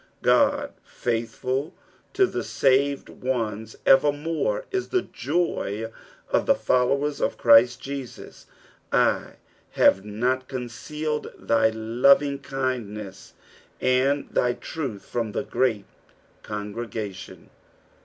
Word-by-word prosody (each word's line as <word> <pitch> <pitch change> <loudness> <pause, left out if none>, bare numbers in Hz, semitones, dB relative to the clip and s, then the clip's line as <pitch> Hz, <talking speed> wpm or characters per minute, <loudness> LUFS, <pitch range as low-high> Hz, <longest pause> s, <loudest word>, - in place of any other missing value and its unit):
God 285 0 +3
faithful 125 +5 -3 0.4
to 390 -1 +4
the - - -3
saved 140 +1 +2
ones 110 -4 -3
evermore 155 - +2
is 380 -1 -1
the 370 -1 +1
joy 120 - -2 0.4
of - - +1
the - - +5
followers 140 +3 +1
of - - 0
Christ 120 +1 +6
Jesus. 135 -2 -8
" - - -27
/ - - -40
hate 95 - +1
not 125 +5 -1
eoncealed 150 +5 -4
thy 115 -1 +2
lot:ivglij<diieii» 125 -3 0 0.5
and 135 +3 +2
thy 125 0 +1
traih 135 -11 -5
from 115 0 -4
th« 135 - -3
great 110 -6 0 0.6
eongi 105 -1 -5
egation.'''' 105 -3 -7
130 Hz, 105 wpm, -25 LUFS, 115-145 Hz, 0.6 s, Christ